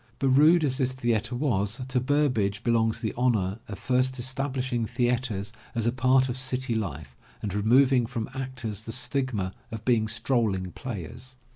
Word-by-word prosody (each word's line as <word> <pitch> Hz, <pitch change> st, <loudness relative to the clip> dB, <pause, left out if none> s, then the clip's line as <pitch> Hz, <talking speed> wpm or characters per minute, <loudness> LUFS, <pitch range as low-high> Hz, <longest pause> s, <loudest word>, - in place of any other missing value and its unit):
But 135 Hz, -, +1 dB
rude 155 Hz, +6 st, +6 dB
as 135 Hz, -2 st, +1 dB
this 130 Hz, -1 st, +1 dB
theatre 120 Hz, -2 st, -1 dB
was, 115 Hz, -5 st, 0 dB
to 130 Hz, -1 st, +1 dB
Burbage 125 Hz, -7 st, +1 dB
belongs 115 Hz, -1 st, +2 dB
the 110 Hz, -, -2 dB
honor 110 Hz, -5 st, +1 dB
of 100 Hz, -, -6 dB
first 130 Hz, +3 st, +1 dB
establishing 130 Hz, -2 st, -1 dB
theatres 120 Hz, -4 st, -1 dB, 0.2 s
as 115 Hz, -2 st, -1 dB
a 120 Hz, -, +3 dB
part 130 Hz, +1 st, +3 dB
of 125 Hz, 0 st, -3 dB
city 130 Hz, -1 st, 0 dB
life 75 Hz, -, -4 dB, 0.3 s
and 100 Hz, -3 st, -2 dB
removing 125 Hz, +4 st, +4 dB
from 110 Hz, -1 st, -4 dB
actors 130 Hz, -6 st, -4 dB
the 115 Hz, -, -3 dB
stigma 125 Hz, -7 st, -1 dB, 0.2 s
of 110 Hz, -1 st, -7 dB
being 115 Hz, -3 st, +3 dB
strolling 110 Hz, -5 st, 0 dB
players. 120 Hz, +3 st, -7 dB
120 Hz, 160 wpm, -27 LUFS, 110-130 Hz, 0.3 s, rude